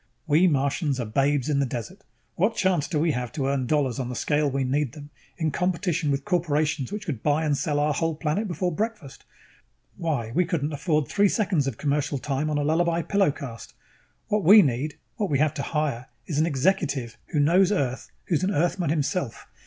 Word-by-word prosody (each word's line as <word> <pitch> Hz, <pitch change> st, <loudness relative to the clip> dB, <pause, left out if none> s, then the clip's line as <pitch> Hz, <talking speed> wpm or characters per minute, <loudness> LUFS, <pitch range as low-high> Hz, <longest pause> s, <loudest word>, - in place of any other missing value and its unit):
We 160 Hz, +4 st, +4 dB
Martians 140 Hz, -1 st, 0 dB
are 120 Hz, -, -2 dB
babes 135 Hz, +4 st, +1 dB
in 145 Hz, -2 st, +1 dB
the 140 Hz, -, +2 dB
desert. 130 Hz, -, -6 dB, 0.3 s
What 205 Hz, +6 st, +1 dB
chance 185 Hz, -7 st, +1 dB
do 155 Hz, -, -2 dB
we 160 Hz, +1 st, +2 dB
have 125 Hz, -3 st, -3 dB
to 140 Hz, -, -2 dB
earn 135 Hz, -2 st, 0 dB
dollars 135 Hz, -4 st, +1 dB
on 125 Hz, -2 st, -3 dB
the 125 Hz, -, -5 dB
scale 150 Hz, +3 st, +1 dB
we 135 Hz, 0 st, -1 dB
need 135 Hz, 0 st, 0 dB
them, 145 Hz, -1 st, -11 dB, 0.3 s
in 160 Hz, -3 st, 0 dB
competition 180 Hz, -2 st, 0 dB
with 140 Hz, -1 st, -1 dB
corporations 155 Hz, -5 st, 0 dB
which 210 Hz, 0 st, -5 dB
could 135 Hz, -, -4 dB
buy 150 Hz, +2 st, +1 dB
and 145 Hz, -2 st, +2 dB
sell 145 Hz, -1 st, -1 dB
our 150 Hz, 0 st, +2 dB
whole 165 Hz, +2 st, -1 dB
planet 160 Hz, +7 st, -1 dB
before 180 Hz, 0 st, -2 dB
breakfast? 210 Hz, -, -4 dB, 0.7 s
Why, 145 Hz, -10 st, -2 dB
we 180 Hz, -, +3 dB
couldn't 155 Hz, -3 st, -2 dB
afford 150 Hz, -2 st, 0 dB
three 200 Hz, -, +3 dB
seconds 185 Hz, -, +1 dB
of 125 Hz, -5 st, -3 dB
commercial 145 Hz, 0 st, 0 dB
time 140 Hz, +2 st, -2 dB
on 150 Hz, -, 0 dB
a 145 Hz, -, 0 dB
Lullaby 170 Hz, +2 st, +1 dB
Pillow 195 Hz, +1 st, +2 dB
'cast. 125 Hz, -5 st, -7 dB, 0.5 s
What 210 Hz, -1 st, 0 dB
we 205 Hz, +4 st, +9 dB
need, 140 Hz, +2 st, -2 dB, 0.2 s
what 210 Hz, -4 st, -1 dB
we 140 Hz, -, +2 dB
have 150 Hz, +1 st, +2 dB
to 145 Hz, -, -4 dB
hire, 140 Hz, -6 st, -2 dB, 0.2 s
is 150 Hz, -4 st, -2 dB
an 160 Hz, -, +3 dB
executive 140 Hz, -, 0 dB
who 150 Hz, -, -1 dB
knows 180 Hz, +6 st, +4 dB
Earth, 135 Hz, -10 st, -1 dB, 0.2 s
who's 170 Hz, -1 st, 0 dB
an 185 Hz, -, +1 dB
Earthman 175 Hz, -2 st, 0 dB
himself. 145 Hz, -3 st, -2 dB
150 Hz, 205 wpm, -25 LUFS, 140-175 Hz, 0.7 s, we